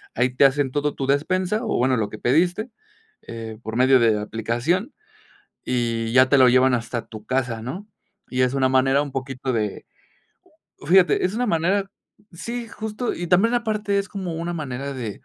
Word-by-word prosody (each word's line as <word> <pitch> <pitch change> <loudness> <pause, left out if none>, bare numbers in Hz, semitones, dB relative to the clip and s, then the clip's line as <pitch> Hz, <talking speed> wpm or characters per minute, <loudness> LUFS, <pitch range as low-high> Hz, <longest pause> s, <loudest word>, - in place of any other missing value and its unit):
ahí 125 +2 +2
te 140 - +5
hacen 135 -1 +2
todo 145 +1 -1
tu 135 - -3
despensa, 185 - 0
o 220 - -1
bueno, 130 +1 +2
lo 105 -2 -1
que 110 - -9
pediste, 175 - +1 0.5
eh, 115 -1 -8
por 110 0 -5
medio 130 +1 +5
de 110 -3 +3
aplicación, 120 - -2 0.7
y 115 -2 -1
ya 130 +1 +5
te 140 - +4
lo 130 -1 +7
llevan 130 +1 +4
hasta 120 0 -3
tu 110 -2 -11
casa, 120 -3 -1
¿no? 175 - -6 0.4
Y 130 - -2
es 125 0 +2
una 130 -1 +2
manera 135 +2 +3
un 145 -2 -7
poquito 135 0 -4
de 105 -4 -3 1.0
Fíjate, 180 +2 +4
es 185 - -5
una 245 +2 0
manera 195 +2 0 0.4
Sí, 235 +7 -5
justo, 220 +2 -4
y 175 - -5
también 190 +7 +3
aparte 215 -4 0
es 200 0 -3
como 190 -4 -5
una 170 +1 -3
manera 140 -3 -5
de 115 -6 -6
135 Hz, 180 wpm, -22 LUFS, 125-185 Hz, 1.0 s, lo